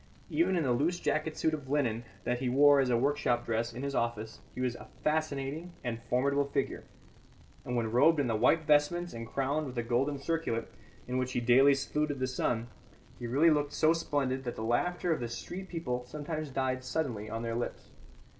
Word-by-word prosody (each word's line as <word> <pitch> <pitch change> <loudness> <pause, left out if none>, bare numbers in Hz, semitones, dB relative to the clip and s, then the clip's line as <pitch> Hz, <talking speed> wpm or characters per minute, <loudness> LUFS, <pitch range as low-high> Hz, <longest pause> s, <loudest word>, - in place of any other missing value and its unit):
Even 330 - +2
in 170 - +1
the 130 - +1
loose 155 +9 +1
jacket 155 +1 -1
suit 160 - +1
of 145 -4 -5
linen 120 -6 0 0.2
that 125 0 -1
he 130 -1 -1
wore 145 +2 +6
as 135 -2 +2
a 120 - +3
workshop 135 -2 +1
dress 115 +1 -1
in 125 +3 -7
his 140 0 -2
office 115 -2 -2 0.2
he - - -6
was 125 -2 0
a - - -11 0.2
fascinating 155 +2 -1
and 115 -2 -3
formidable 140 +3 +2
figure; - - -2 0.8
and 125 - -3
when 115 -2 0
robed 155 +7 +5
in 145 - +2
the 115 -2 0
white 160 +9 +3
vestments 150 +4 +2
and 115 0 -6
crowned 140 +5 -1
with 130 - -7
the 120 - -1
golden 130 +5 0
circlet, 140 -6 -2 0.4
in 125 +1 -1
which 130 0 -2
he - - +1
daily 130 +4 +6
saluted 145 +1 -1
the 130 - 0
sun, 125 -2 -1 0.5
he 120 - -4
really 145 +7 +4
looked 145 -1 +1
so 160 +1 +4
splendid 140 -5 -1
that 120 -2 -4
the 110 - -5
laughter 175 +9 +1
of 155 - -3
the 120 -1 -3
street 180 +10 -6
people 125 -8 -3
sometimes 155 +2 -4
died 130 -1 -1
suddenly 130 -8 -2
on 115 +1 -4
their 115 0 -2
lips. 120 +1 -4
135 Hz, 205 wpm, -31 LUFS, 120-150 Hz, 0.8 s, wore